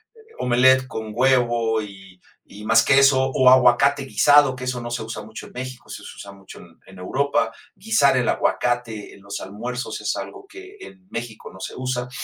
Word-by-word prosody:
el 445 -1 -20
omelette 130 +1 +3
con 110 -3 -6
huevo 120 -3 +1
y 95 -3 -13 0.2
y 105 +1 -12
más 115 +1 +4
queso 135 0 +4
o 130 -1 +5
aguacate 130 +2 +4
guisado 145 0 +4
que 130 0 -8
eso 125 -1 -3
no 120 0 -7
se 120 - -3
usa 110 -1 -7
mucho 110 +1 -10
en - - -18
México, 130 0 -8
eso - - -9
se - - -11
usa 100 -1 -11
mucho 95 -1 -14
en 85 -1 -18
en 95 -1 -15
Europa. 115 +2 -1 0.2
Guisar 190 -10 +2
el 125 - 0
aguacate 120 -3 -2
en - - -17
los 100 +1 -7
almuerzos 110 +4 -6
es 105 - -2
algo 400 0 -8
que 390 0 -13
en 190 - -14
México 115 -2 -7
no 95 - -15
se 95 - -7
usa. 125 -1 -4
125 Hz, 195 wpm, -22 LUFS, 110-130 Hz, 0.2 s, o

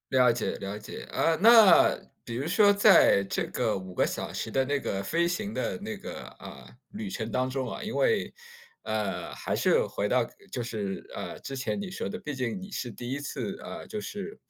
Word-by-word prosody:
了 125 -1 +5
解， 115 -1 -1
了 100 +1 -5
解， 105 - -8
啊， 165 -1 +1
那 220 -4 +8 0.3
比 115 - -5
如 130 +4 -2
说 205 +4 +5
在 200 - +6
这 95 - -2
个 - - -1
5 95 -1 -8
个 - - +2
小 - - -4
时 - - -4
的 135 0 +2
那 145 +2 0
个 100 -7 -2
飞 165 +12 +1
行 205 +5 -2
的 - - -2
那 215 0 -5
个， 205 - -8
呃， 65 -2 -11 0.2
旅 210 0 -6
程 115 - -4
当 130 0 0
中 130 0 -3
啊， - - -6
因 220 0 -5
为 485 -2 +1 0.5
呃， - - -3
还 - - -3
是 475 +1 +3
回 - - -2
到 - - +2 0.2
就 125 - -3
是， 105 -5 -4
呃， - - -6
之 135 - -6
前 125 - -2
你 200 -2 -4
说 190 - -4
的 220 - -5
毕 150 -8 -5
竟 125 +5 -2
你 190 +1 -9
是 125 -10 -4
第 120 +3 -7
1 140 +2 -3
次， 195 +6 -4
呃， 220 +1 -8
就 215 - -5
是， 205 -1 -6
150 Hz, 220 characters per minute, -28 LUFS, -, 0.5 s, 那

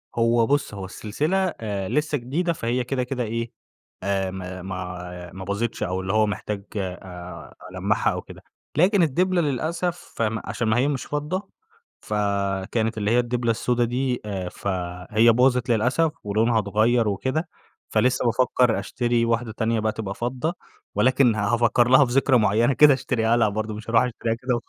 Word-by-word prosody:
هو 115 0 +3
بُصّ 145 -4 0
هو 95 -2 -6
السلسلة 130 - -2 0.2
آآ 100 -3 -3
لسه 150 0 0
جديدة 160 +8 -1
فهي 125 -2 -1
كده 125 +1 -1
كده 125 0 -3
إيه، 115 +1 -3 0.6
آآ، 95 -1 0
ما 95 -1 -7
ما 90 -1 -6
ما 95 0 -8
باظتش 100 +4 -2
أو 90 +1 -1
اللي 95 0 -2
هو 110 0 +3
محتاج 105 -1 -4
آآ 90 -2 -7 0.2
ألمّعها - - +1
أو - - -4
كده، - - -13 0.3
لكن 185 +5 +4
الدبلة 180 +4 +2
للأسف 165 +4 -2
فم 110 -1 0
عشان 115 - -2
ما 110 - +3
هي 135 +4 +2
مش 140 -3 -2
فضة 165 +7 -3 0.5
ف 105 - -5 0.6
كانت 110 -1 0
اللي 105 0 0
هي 120 - +4
الدبلة 120 -1 0
السودة 120 +2 +1
دي، 125 +1 -1
آآ، 95 -3 -4
فهي 95 +5 +1
باظِت 125 +1 +2
للأسف 125 +8 +2
ولونها 110 +3 +2
اتغَيّر 110 +1 +2
وكده. 130 - -1 0.4
فلِسّه 125 0 +2
بافكر 125 0 +2
أشتري 120 -1 0
واحدة 115 -1 0
تانية 115 0 0
بقى 110 0 0
تبقى 105 -3 -5
فضة، 125 +9 -2 0.4
ولكن 130 -2 +4
ه 110 - -4 0.2
هافَكّر 120 +1 +3
لها 130 +3 +7
في 120 - -4
ذكرى 135 -1 +4
معينة 110 +4 +3
كده 145 +1 +7
أشتريها 120 -3 +1
لها 115 -2 +3
برضه 110 +1 -3
مش 110 +2 -7
هاروح 115 -1 +5
أشتريها 115 -2 -2
كده 125 +2 -2
وخ 120 - -5
115 Hz, 175 wpm, -24 LUFS, 105-130 Hz, 0.6 s, لها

